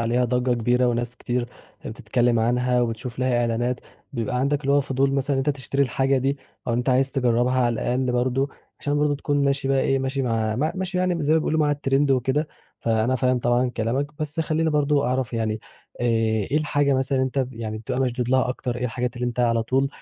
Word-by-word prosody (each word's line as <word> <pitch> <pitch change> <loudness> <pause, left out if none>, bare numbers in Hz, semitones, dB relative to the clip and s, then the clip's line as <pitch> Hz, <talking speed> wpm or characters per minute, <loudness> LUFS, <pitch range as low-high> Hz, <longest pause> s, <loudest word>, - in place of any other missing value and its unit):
عليها 120 +2 +1
ضجّة 125 +1 +1
كبيرة، 120 +2 +2
وناس 120 0 -1
كتير 120 0 -2 0.4
بتتكلم 120 -1 0
عنها 125 +2 +2
وبتشوف 120 +1 -3
لها 125 -2 +1
إعلانات 120 +1 0 0.3
بيبقى 125 0 -2
عندك 140 +3 +1
اللي 140 -1 0
هو 145 - +5
فضول 135 0 0
مثلًا 140 +1 0
إن - - 0
أنت - - +4
تشتري 140 0 -1
الحاجة 135 +1 +1
دي، 135 +2 -1 0.3
أو - - +1
أنت 120 +2 -1
عايز 130 +1 +2
تجرّبها 125 0 +2
على 120 -1 +2
الأقل 125 +2 -1
برضه 130 +3 +1 0.3
عشان 145 0 0
برضه 150 0 +2
تكون 145 0 0
ماشي 140 -1 0
بقى 135 -1 +3
إيه 135 0 +2
ماشي 135 +1 -2
مع 110 -3 0
م 155 +5 0
ماشي 185 -1 -2
يعني 180 -4 0
زي 150 - +3
ما 160 - +5
بيقولوا 155 0 0
مع 150 -1 +3
الtrend 140 0 +1
وكده، 135 +4 +1 0.3
فأنا 115 +2 +1
فاهم 130 0 +2
طبعًا 120 +1 +1
كلامك، 120 +5 -1
بس 155 +1 -2
خليني 160 0 0
برضه 145 -3 +2
أعرف 130 -1 -1
يعني 110 -1 -1 0.4
آآ، 120 - -1 0.5
إيه 150 - +2
الحاجة 145 -2 +2
مثلًا 130 0 0
اللي 130 - +2
أنت 130 -1 -1
يعني 110 -2 -5
بتبقى 115 +4 -3
مشدود 125 -2 -1
لها 130 0 +2
أكتر، 125 -1 -3
إيه 125 - -3
الحاجات 125 +1 -2
اللي 125 0 -2
أنت 120 0 -2
على 115 -1 +2
طول 135 +4 +1
130 Hz, 215 wpm, -24 LUFS, 120-140 Hz, 0.5 s, هو